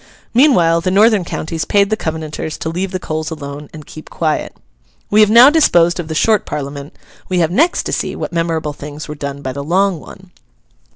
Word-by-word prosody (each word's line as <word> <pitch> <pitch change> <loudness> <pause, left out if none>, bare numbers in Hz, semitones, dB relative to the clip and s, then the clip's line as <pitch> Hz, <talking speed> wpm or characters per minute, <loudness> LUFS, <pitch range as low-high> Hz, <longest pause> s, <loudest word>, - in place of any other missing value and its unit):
Meanwhile 180 - +4
the 185 - -1
northern 210 +1 +4
counties 165 -1 -4
paid 200 +5 +1
the - - +3
Covenanters 155 -3 -5
to 160 - -4
leave 180 +4 -3
the 185 0 -4
coals 155 -2 -4
alone, 145 -2 -8
and 155 -2 -11
keep 155 - -12
quiet. 155 -2 -2 0.5
We 210 - +4
have 210 - +5
now 240 +5 +8
disposed 175 - +3
of 170 - -4
the 160 - -5
Short 215 +5 +2
Parliament. 140 0 -6 0.3
We 185 - 0
have 170 -1 +1
next 325 - +2
to - - -4
see - - -2
what - - -5
memorable 165 -3 -1
things 145 +1 -9
were 150 - -6
done 140 -1 -6
by 130 - -4
the 140 +1 -5
Long 185 +3 +1
one. 190 +4 -14
165 Hz, 205 wpm, -16 LUFS, 150-195 Hz, 0.5 s, now